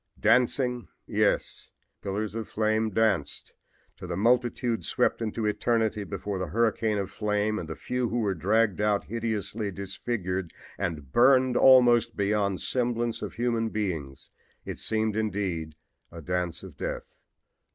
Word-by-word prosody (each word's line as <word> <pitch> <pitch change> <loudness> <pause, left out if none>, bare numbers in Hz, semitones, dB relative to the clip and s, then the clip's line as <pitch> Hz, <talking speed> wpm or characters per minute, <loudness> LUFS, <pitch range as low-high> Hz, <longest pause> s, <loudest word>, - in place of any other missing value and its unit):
Dancing! 125 0 +2 0.2
Yes, - - 0 0.3
the - - -10
pillars 105 +1 -2
of 115 -1 -5
flame 110 0 +1
danced! 100 -8 0 0.4
To 90 - -8
the 85 -1 -3
multitude 120 -1 +1
swept - - +1
into 110 0 -2
eternity 105 0 0
before 100 0 -4
the 90 - -2
hurricane 110 +2 +1
of 100 -1 -3
flame 105 0 0
and 80 - -7
the 80 - -4
few 125 -2 -2
who 120 - -2
were 105 -4 +1
dragged 105 +4 +1
out 105 -1 +2
hideously 110 -1 -3
disfigured 95 -2 -4 0.2
and 75 -6 -4
burned 130 - +5
almost 120 -3 +6
beyond 100 0 +1
all - - -4
semblance 120 -1 -1
of - - -5
human 115 -1 0
beings 85 -11 -4 0.3
it - - -6
seemed 110 -1 0
indeed 95 -8 -2 0.4
a 85 - -9
dance 90 0 -3
of - - -11
death. - - -5
105 Hz, 145 wpm, -27 LUFS, 95-115 Hz, 0.4 s, almost